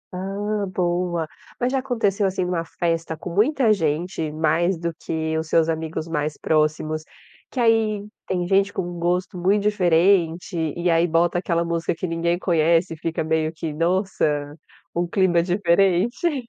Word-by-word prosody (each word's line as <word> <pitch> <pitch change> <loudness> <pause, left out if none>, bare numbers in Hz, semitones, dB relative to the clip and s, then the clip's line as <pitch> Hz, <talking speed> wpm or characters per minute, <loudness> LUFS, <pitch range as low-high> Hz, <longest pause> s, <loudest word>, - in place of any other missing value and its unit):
Ah 200 +2 -2
boa. 175 -2 -1 0.3
Mas 250 +1 0
já 270 - +1
aconteceu, 220 -6 0
assim, 185 -1 -1
numa 175 -2 -1
festa 165 -1 -2
com 170 - -7
muita 230 - +3
gente, 160 -2 -1
mais 160 +3 +1
do 170 0 -3
que 160 0 -3
os 160 - -4
seus 165 0 +3
amigos 160 0 -3
mais 150 -2 -2
próximos, 155 0 0 0.5
que 255 - -5
aí 220 -3 +2 0.2
tem 180 -2 -1
gente 195 +1 +3
com 175 -2 -4
gosto 180 +1 -1
muito 200 +3 +2
diferente 180 -2 +2 0.2
e 175 +1 -1
aí 165 +1 +3
bota 170 +2 +2
aquela 170 -2 0
música 170 0 -1
que 185 - -4
ninguém 170 +1 0
conhece, 170 0 +2
e - - -9
fica 165 0 -2
meio 160 0 0
que 160 -1 -5
nossa 165 -4 0 0.4
um 175 0 0
clima 175 -2 +2
diferente? 195 - +1
175 Hz, 155 wpm, -23 LUFS, 165-195 Hz, 0.5 s, muita